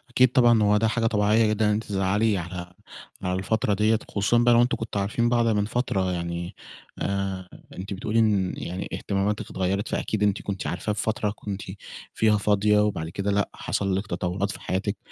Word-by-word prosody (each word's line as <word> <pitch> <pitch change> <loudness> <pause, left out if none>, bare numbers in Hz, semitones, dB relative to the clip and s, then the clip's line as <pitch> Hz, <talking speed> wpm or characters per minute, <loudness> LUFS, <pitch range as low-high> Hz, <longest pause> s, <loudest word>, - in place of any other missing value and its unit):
أكيد 125 -1 +5
طبعًا، 120 -4 +5
هو 105 0 +4
ده 110 +1 +2
حاجة 115 0 0
طبيعيّة 105 +1 +3
جدًا 110 +1 +1
إن 105 - +3
أنتِ 105 +2 0
تزعلي 100 +1 +1
على 90 0 -6 0.5
على 90 0 0
الفترة 105 +1 0
ديّة، 110 +2 +2
خصوصًا 105 +4 +1
بقى 120 0 +5
لو 120 - +6
أنتم 120 - +1
كنتوا 110 -3 -3
عارفين 115 +4 0
بعض 120 -1 +2
من 105 -2 +2
فترة 100 -5 -1
يعني. 85 0 -4 0.4
آآ، 95 -2 -2 0.3
أنتِ 100 +2 -5
بتقول 105 +2 -4
لي 115 - +4
إن 100 -4 +2
يعني 90 +2 -5
اهتماماتِك 100 +1 -1
اتغيّرت، 95 +2 -1
فأكيد 105 -1 -1
أنتِ 100 -1 +1
كنتِ 100 -2 -4
عارفاه 95 +5 -2
في - - -2
فترة 110 -1 0
كنتِ 100 -1 -5 0.5
فيها 110 -1 +3
فاضية 105 +1 +3
وبعد 95 -6 0
كده 100 +4 -2
لأ، 100 0 +1
حصل 100 -1 -1
لِك 100 +2 -4
تطوّرات 90 +3 -2
في - - -9
حياتِك، 100 +2 -2
105 Hz, 195 wpm, -25 LUFS, 95-110 Hz, 0.5 s, لو